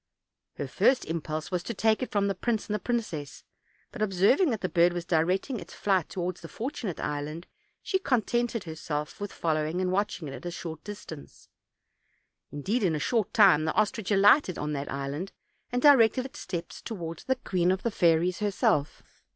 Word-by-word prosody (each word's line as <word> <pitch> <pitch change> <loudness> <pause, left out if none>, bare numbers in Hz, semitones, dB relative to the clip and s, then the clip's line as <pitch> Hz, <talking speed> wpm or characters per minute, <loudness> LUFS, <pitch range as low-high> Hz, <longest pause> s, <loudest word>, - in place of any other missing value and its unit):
Her - - -4
first 260 0 +2
impulse 155 0 -4
was 180 -1 0
to 230 +5 -5
take 220 +1 +2
from 200 -1 +1
it - - +1
the - - +1
prince 220 +3 -2
and 210 - -2
princess; 210 - -3 0.5
but 240 - -8
observing 215 - +3
that 225 -5 -2
the 185 - 0
bird 175 0 +3
was 175 -1 -4
directing 180 - +1
its - - -11
flight 190 -5 +1
toward 180 -1 -3
the 165 - -10
Fortunate 225 - -5
Island, 150 +4 -4 0.4
she 380 - 0
contented 240 - 0
herself 155 0 -5
with 205 - -4
following 155 +1 -1
and 185 -1 0
watching 190 -4 -1
it 135 - -6
at - - -9
a - - -1
short 165 -2 -7
distance. 200 -8 -10 1.0
Indeed, 195 - -1
in 175 -6 +2
a - - -2
short 225 +4 0
time 185 -8 +6
the 160 - 0
ostrich 215 -1 0
alighted 205 - +5
on 150 0 -3
that 140 0 -4
island, 140 +7 -4 0.4
and 245 +1 -1
directed 255 -3 +6
its 270 +2 -9
steps 170 -2 -6
toward 170 -7 -6
the 260 - +3
queen 180 -8 0
of 190 0 -1
the 235 - 0
fairies 175 -1 +2
herself. 205 - 0
185 Hz, 185 wpm, -28 LUFS, 160-220 Hz, 1.0 s, time